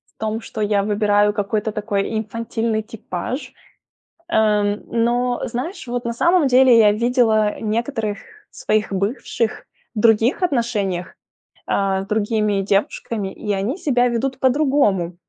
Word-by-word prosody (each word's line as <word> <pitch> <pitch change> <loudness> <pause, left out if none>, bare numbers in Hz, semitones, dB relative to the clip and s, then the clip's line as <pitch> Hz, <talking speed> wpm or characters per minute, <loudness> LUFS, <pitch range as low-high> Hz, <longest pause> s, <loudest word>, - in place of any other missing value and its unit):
в - - -56
том, 220 0 -2
что 220 -1 -7
я 205 -1 +2
выбираю 205 0 +2
какой-то 210 +1 -1
такой 210 0 -2
инфантильный 225 0 -2
типаж. 225 - -6 0.8
Эм, 210 -4 +2
но, 240 +1 0
знаешь, 265 - -5
вот 245 0 -3
на 235 - -2
самом 340 +4 +3
деле, 255 -1 +6
я 210 -2 +6
видела 220 -2 +2
некоторых 220 -1 -2 0.3
своих 215 -1 -1
бывших 220 +3 -2 0.3
в 215 - -2
других 225 - +3
отношениях, 215 - -1 0.5
а, 195 -1 0
с - - -13
другими 210 -1 0
девушками, 200 +1 -1
и 210 -2 -3
они 200 - -2
себя 250 -8 +2
ведут 260 +3 -2
по-другому. 260 - +2
220 Hz, 130 wpm, -20 LUFS, 205-245 Hz, 0.8 s, деле